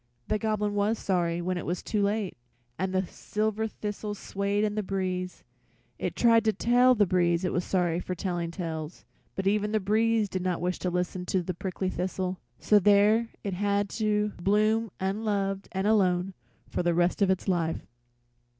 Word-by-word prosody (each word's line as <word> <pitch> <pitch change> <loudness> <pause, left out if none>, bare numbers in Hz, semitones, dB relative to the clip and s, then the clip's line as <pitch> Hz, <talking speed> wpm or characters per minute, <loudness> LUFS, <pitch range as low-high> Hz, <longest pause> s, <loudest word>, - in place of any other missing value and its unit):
The 215 - +1
Goblin 210 -2 0
was 205 +2 +1
sorry 175 -3 0
when 180 0 -1
it - - -6
was 175 +2 -2
too 210 - -1
late, 205 -1 0 0.4
and 190 0 -1
the 185 0 +1
silver 215 +4 -2
thistle 210 -1 -5
swayed 200 +1 -1
in 210 -1 0
the 215 - -1
breeze. 185 -2 -3 0.6
It - - -2
tried 230 -1 +5
to 220 - +3
tell 245 +3 +4
the 210 -2 +4
breeze 175 -1 +2
it 180 - -1
was 175 - 0
sorry 175 -3 0
for 180 +1 -4
telling 175 -2 -2
tales, 165 -2 -5 0.3
but 190 - -3
even 210 +1 +1
the 215 - +3
breeze 220 +2 +2
did 185 -1 -3
not 180 -1 -1
wish 180 +1 -2
to 180 - -1
listen 180 +1 -2
to 185 -1 0
a 185 - -1
prickly 185 +1 -3
thistle, 185 0 -3 0.2
so 210 - +4
there 210 +3 +4
it 200 - -2
had 200 +1 0
to 210 -1 0
bloom 215 +4 +2
unloved 195 0 -1
and 190 0 -2
alone 190 -3 +2 0.4
the 175 -1 +1
rest 175 +3 +1
of 195 - +4
its 190 +1 0
life. 170 -3 0
195 Hz, 180 wpm, -28 LUFS, 180-210 Hz, 0.6 s, tried